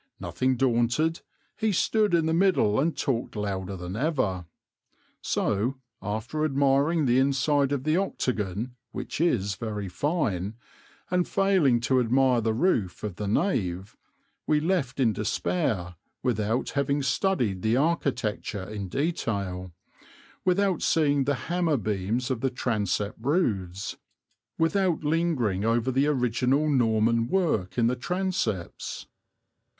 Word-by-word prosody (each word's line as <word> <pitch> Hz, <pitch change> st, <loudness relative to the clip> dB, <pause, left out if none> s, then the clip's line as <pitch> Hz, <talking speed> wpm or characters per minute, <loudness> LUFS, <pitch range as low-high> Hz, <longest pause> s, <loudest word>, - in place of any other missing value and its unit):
Nothing 130 Hz, 0 st, 0 dB
daunted 125 Hz, +6 st, +1 dB, 0.4 s
he 220 Hz, -1 st, 0 dB
stood 210 Hz, 0 st, +2 dB
in 165 Hz, -2 st, +2 dB
the 160 Hz, -, +1 dB
middle 170 Hz, -, +3 dB
and 160 Hz, +4 st, 0 dB
talked 125 Hz, -4 st, -1 dB
louder 100 Hz, -2 st, -3 dB
than 90 Hz, +1 st, -6 dB
ever. 115 Hz, -, -1 dB, 0.7 s
So, 110 Hz, +6 st, 0 dB, 0.3 s
after 110 Hz, +9 st, -3 dB
admiring 140 Hz, +2 st, +2 dB
the 125 Hz, 0 st, +4 dB
inside 140 Hz, +1 st, +2 dB
of 140 Hz, -3 st, -1 dB
the 155 Hz, +3 st, +2 dB
octagon, 115 Hz, -, -2 dB, 0.2 s
which -, -, -4 dB
is 105 Hz, -, +1 dB
very 105 Hz, +1 st, -4 dB
fine, 105 Hz, -, -1 dB, 0.6 s
and 180 Hz, -1 st, +2 dB
failing 190 Hz, -11 st, +3 dB
to 130 Hz, +2 st, +2 dB
admire 125 Hz, 0 st, +3 dB
the 110 Hz, 0 st, 0 dB
roof 115 Hz, -, 0 dB
of 105 Hz, -5 st, -4 dB
the 105 Hz, -, -3 dB
nave, 100 Hz, -, -1 dB, 0.5 s
we 150 Hz, -, +3 dB
left 160 Hz, -6 st, -1 dB
in 115 Hz, -5 st, +3 dB
despair 105 Hz, -, -1 dB, 0.3 s
without 115 Hz, -1 st, 0 dB
having 140 Hz, 0 st, 0 dB
studied 125 Hz, -, 0 dB
the 110 Hz, +4 st, +2 dB
architecture 130 Hz, -, -1 dB
in 100 Hz, -3 st, -5 dB
detail, 100 Hz, -, -2 dB, 0.7 s
without 185 Hz, -1 st, +2 dB
seeing 145 Hz, -4 st, +2 dB
the 140 Hz, +1 st, +1 dB
hammer 170 Hz, -4 st, +1 dB
beams 110 Hz, +4 st, -1 dB
of 120 Hz, -3 st, -2 dB
the 135 Hz, -, +1 dB
transept 105 Hz, -5 st, -1 dB
roofs, 100 Hz, -, -1 dB, 0.6 s
without 175 Hz, 0 st, +1 dB
lingering 150 Hz, -, +1 dB
over 115 Hz, +3 st, +1 dB
the 135 Hz, +3 st, +2 dB
original 130 Hz, +1 st, +1 dB
Norman 115 Hz, -4 st, +2 dB
work 130 Hz, -, 0 dB
in 120 Hz, -, +3 dB
the 120 Hz, +2 st, +2 dB
transepts. 155 Hz, -, -3 dB
125 Hz, 125 wpm, -27 LUFS, 105-155 Hz, 0.7 s, the